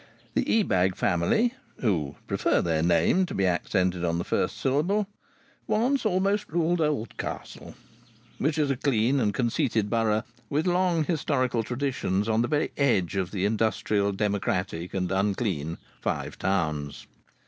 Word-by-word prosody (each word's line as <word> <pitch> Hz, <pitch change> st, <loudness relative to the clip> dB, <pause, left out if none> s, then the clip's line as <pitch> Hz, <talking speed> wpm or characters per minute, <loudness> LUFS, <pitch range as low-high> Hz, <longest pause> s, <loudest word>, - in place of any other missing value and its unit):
The -, -, +1 dB, 0.2 s
Ebag 95 Hz, -, +1 dB
family, 100 Hz, -, +2 dB, 0.2 s
who 80 Hz, -, 0 dB
prefer -, -, +1 dB
their 80 Hz, -2 st, +1 dB
name 170 Hz, -, +3 dB
to -, -, -6 dB
be 95 Hz, -, +1 dB
accented 90 Hz, 0 st, 0 dB
on 85 Hz, -1 st, 0 dB
the 85 Hz, -, -1 dB
first -, -, -1 dB
syllable, 170 Hz, +11 st, +1 dB, 0.6 s
once 245 Hz, +3 st, +2 dB
almost 200 Hz, +2 st, +1 dB
ruled 170 Hz, +1 st, +1 dB
Oldcastle, 150 Hz, -7 st, -3 dB, 0.6 s
which 155 Hz, +3 st, 0 dB
is 145 Hz, -3 st, +2 dB
a -, -, +1 dB
clean 130 Hz, 0 st, +2 dB
and 105 Hz, -4 st, +2 dB
conceited 115 Hz, -3 st, 0 dB
borough, 110 Hz, -1 st, +2 dB, 0.3 s
with 150 Hz, +2 st, 0 dB
long 180 Hz, -2 st, +2 dB
historical 135 Hz, -7 st, 0 dB
traditions, 120 Hz, -5 st, -1 dB
on 110 Hz, 0 st, +2 dB
the 120 Hz, -, +1 dB
very 150 Hz, +1 st, 0 dB
edge 105 Hz, -, +2 dB
of 95 Hz, -2 st, -1 dB
the 95 Hz, -1 st, -1 dB
industrial, 105 Hz, -1 st, +1 dB
democratic 95 Hz, -4 st, -2 dB
and 90 Hz, -1 st, -1 dB
unclean 95 Hz, -5 st, -1 dB, 0.2 s
Five -, -, -3 dB
Towns. 75 Hz, -7 st, -1 dB
110 Hz, 140 wpm, -27 LUFS, 95-150 Hz, 0.6 s, name